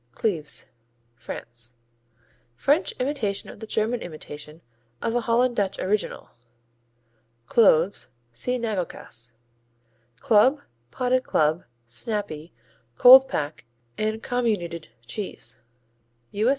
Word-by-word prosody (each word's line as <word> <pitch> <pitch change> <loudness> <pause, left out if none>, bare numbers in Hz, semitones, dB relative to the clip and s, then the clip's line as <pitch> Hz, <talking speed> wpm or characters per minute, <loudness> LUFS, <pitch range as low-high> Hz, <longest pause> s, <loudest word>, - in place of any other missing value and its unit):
Cleves 165 -9 -1 0.5
France 120 0 -8 0.8
French 295 - +2
imitation 250 -7 -2
of - - -14
the 220 - -8
German 225 +3 0
imitation 155 -1 -9 0.4
of 225 - -1
a 240 - +1
Holland 240 +1 +2
Dutch 200 -3 0
original. 205 +2 -2 1.1
Cloves 190 - +4 0.2
see 250 - -1
Nagelkäse. 180 - -4 0.9
Club, 255 +7 +4 0.3
Potted 255 - +1
Club, 155 +2 +1 0.2
Snappy, 170 - -4 0.4
Cold 260 - +10
pack 150 - -3 0.3
and 215 +1 -2
Comminuted 205 -10 -1 0.2
cheese 200 - -5 0.7
_U.S. 215 +4 +2
210 Hz, 95 wpm, -25 LUFS, 155-240 Hz, 1.1 s, Cold